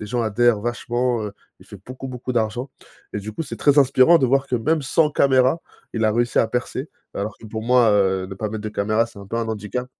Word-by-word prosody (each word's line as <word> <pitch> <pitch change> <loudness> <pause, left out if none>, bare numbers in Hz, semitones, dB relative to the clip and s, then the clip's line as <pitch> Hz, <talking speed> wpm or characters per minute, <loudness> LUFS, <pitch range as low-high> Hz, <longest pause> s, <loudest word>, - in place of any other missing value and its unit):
les 105 - -6
gens 120 +3 -1
adhèrent 115 +1 +2
vachement, 120 +1 -1
heu, 105 - -5 0.3
il - - -17
fait 105 - -11
beaucoup 130 +1 -8
beaucoup 125 0 -5
d'argent. 120 +3 -1 0.4
Et - - -2
du 105 +1 -6
coup 165 - -4
c'est - - -7
très 145 0 +3
inspirant 135 +4 +6
de 130 - +2
voir 135 +2 +2
que 125 - +1
même 150 +7 0
sans 150 +3 +2
caméra 135 +2 +3 0.3
il 110 -1 -1
a 110 - +4
réussi 120 +1 +1
à - - +2
percer 125 +4 -3 0.3
alors 105 +1 -4
que - - -15
pour 110 0 -5
moi, 120 -1 +4
heu, 95 -2 +2
ne 95 - -8
pas 105 +2 -3
mettre 110 0 -5
de 110 - -3
caméra 110 +2 +1
c'est 115 -3 -15
un 100 - -10
peu 115 - -4
un 115 -1 -1
handicap. 110 +3 -4
120 Hz, 250 wpm, -22 LUFS, 110-130 Hz, 0.4 s, inspirant